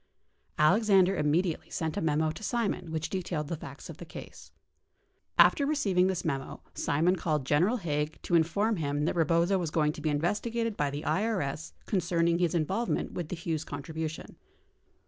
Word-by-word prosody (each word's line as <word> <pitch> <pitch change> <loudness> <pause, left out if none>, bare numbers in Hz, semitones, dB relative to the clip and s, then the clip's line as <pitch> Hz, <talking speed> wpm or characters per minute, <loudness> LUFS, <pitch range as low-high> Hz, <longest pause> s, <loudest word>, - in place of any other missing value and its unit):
Alexander 195 +3 +4
im 150 -3 +1
mediately 170 +2 0
sent 160 -1 -2
a - - -1
memo 155 0 +1
to 155 - -9
Simon 220 -7 -1
which 160 0 -2
detailed 170 -5 -3
the 170 - -1
facts 160 - -10
of - - -9
the - - -8
case. - - -11 0.9
After 285 - +6
receiving 200 -12 +2
this 185 -2 -2
memo, 135 -4 -3
Simon 165 +6 +1
called 155 -4 -1
General 175 - +3
Haig 150 -5 -2
to - - -4
inform 195 +7 +2
him 145 -1 -1
that - - +1
Eebozo 170 +3 +2
was 170 -3 -2
going 150 -1 +2
to 155 - -9
be 155 - 0
investigated 210 +9 -1
by 145 -5 0
the 145 +2 -5
IES 185 -8 -1
concerning 170 -3 +1
his 175 -1 +1
involvement 190 +9 0
with 170 -4 -4
the - - -3
Hughes 165 -2 -3
contribution. 155 +2 -6
165 Hz, 170 wpm, -29 LUFS, 155-190 Hz, 0.9 s, After